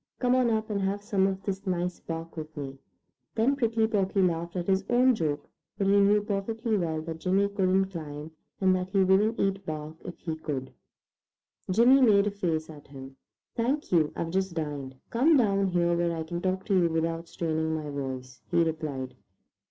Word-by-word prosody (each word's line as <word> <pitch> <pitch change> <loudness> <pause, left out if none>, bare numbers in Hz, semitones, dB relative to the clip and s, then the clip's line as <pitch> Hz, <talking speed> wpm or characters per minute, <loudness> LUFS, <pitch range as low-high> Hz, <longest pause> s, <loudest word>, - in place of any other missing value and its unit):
"Come 250 -1 +2
on 255 -2 +3
up 220 -1 -1
and 200 -1 -1
have 200 +1 -1
some 200 -3 +2
of 190 0 -3
this 195 0 -4
nice 180 -1 -1
bark 165 0 -6
with 155 -1 -8
me." 135 -1 -6 0.6
Then 245 +6 +3
Prickly 230 -4 +1
Porky 195 -3 +1
laughed 170 -1 -1
at 175 -1 -2
his 190 +1 +2
own 250 +1 +5
joke, 150 -8 -2 0.3
for - - 0
he 200 +1 +4
knew 205 +1 +4
perfectly 220 +2 -1
well 160 -5 -1
that 160 0 -6
Jimmy 190 +3 +2
couldn't 190 -1 +1
climb, 155 -2 -7 0.3
and 185 -1 +4
that 185 0 -2
he 195 0 +3
wouldn't 200 +4 +3
eat 195 0 0
bark 155 -1 -6
if 175 - -8
he 160 -3 -4
could. 140 -4 -5 1.0
Jimmy 240 +8 +6
made 205 -5 +5
a 205 - 0
face 165 -6 -2
at 150 -2 -12
him. 135 -1 -10 0.4
"Thank 265 +6 -1
you, 160 -4 +3
I've 165 - -3
just 190 -1 -1
dined. 145 -4 -4 0.2
Come 290 +7 +4
down 200 -5 +2
here 175 -1 +2
where 170 -1 0
I 160 - -2
can 170 +2 -5
talk 185 0 -1
to 205 - 0
you 170 - +3
without 165 +1 -1
straining 160 -1 -1
my 150 -2 -4
voice," 130 -2 -6
he 170 -1 +3
replied. 150 -5 -3
185 Hz, 195 wpm, -28 LUFS, 160-200 Hz, 1.0 s, Jimmy